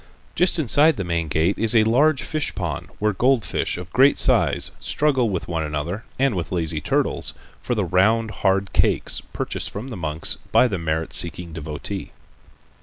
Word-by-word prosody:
Just 180 0 +3
inside 150 0 +3
the 95 - -2
main 85 -2 -2
gate 80 +5 0
is 115 +1 +3
a 110 - +6
large 140 +6 +3
fish 155 -1 -2
pond, 85 -6 -4
where 105 0 0
goldfish 125 -1 +1
of 90 0 -9
great 135 +2 +5
size - - +2
struggle 135 -6 +1
with 90 -4 -3
one 80 -2 -2
another, 75 - -4
and 135 -2 +2
with 90 -4 -3
the - - -3
lazy 80 -2 -1
turtles, - - 0 0.3
for - - -2
the - - 0
round 110 +4 +2
hard 95 0 +1
cakes - - +1
purchased - - -3
from 110 +7 -7
the 120 - -6
monks 80 -3 -2
by 125 - +5
the 100 -6 -3
merit 80 0 -2
seeking 85 -1 -1
devotee. 75 -2 -5
95 Hz, 180 wpm, -22 LUFS, 85-125 Hz, 0.3 s, a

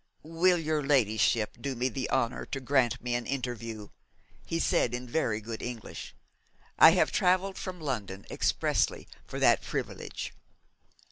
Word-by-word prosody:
'Will 170 +3 +3
your 155 -2 0
ladyship 115 -5 +2
do 135 0 -3
me 125 +2 0
the 130 +1 -3
honour 125 -3 0
to 135 - -4
grant 130 -3 +1
me 125 0 -1
an 120 -1 -2
interview?' 115 -5 -4 0.6
he 165 - -1
said 120 -6 +2
in 125 +1 -6
very 120 -5 0
good 110 +1 -6
English. 120 -3 -7 0.6
'I - - +11
have - - +2
travelled 185 +2 +2
from 185 -2 -6
London 105 -10 -4
expressly - - 0 0.2
for - - -6
that - - +5
privilege.' - - -5
125 Hz, 145 wpm, -29 LUFS, 115-155 Hz, 0.6 s, I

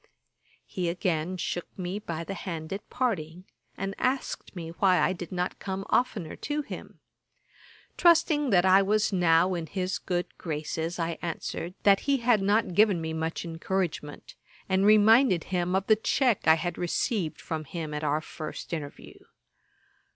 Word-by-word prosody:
He 180 -4 -2
again 175 0 -1
shook 175 0 -3
me 185 +2 -3
by 165 -5 -5
the 195 - -5
hand 170 -3 -5
at 200 - -7
parting, 180 -8 -2 0.3
and 195 0 -3
asked 255 -5 -2
me 165 -2 -6
why 185 -2 +4
I 185 - +2
did 175 -2 -8
not 180 0 -2
come 195 0 -4
oftener 205 -10 0
to 295 +1 -2
him. - - -9 1.0
Trusting 320 -4 +4
that 185 -4 +4
I 190 +1 +6
was 210 +1 +1
now 175 0 +4
in 170 -2 -3
his 185 0 -2
good 175 -1 -3
graces, 160 +1 -3
I 165 -1 -2
answered, 170 +1 -4
that 200 -1 +6
he 280 - +4
had 235 -4 +3
not 205 0 +2
given 205 -1 +4
me 160 0 -4
much 160 +2 -3
encouragement, 165 -2 -3 0.3
and 190 +1 +2
reminded 215 -2 +6
him 180 0 -1
of 190 0 +1
the 215 - +5
check 235 - +1
I 160 - +8
had 175 +2 -3
received 175 - -1
from 155 -1 -4
him 155 0 -5
at 150 +1 -4
our 150 +1 +1
first 155 +1 -7
interview. 150 -3 -7
180 Hz, 160 wpm, -28 LUFS, 165-205 Hz, 1.0 s, I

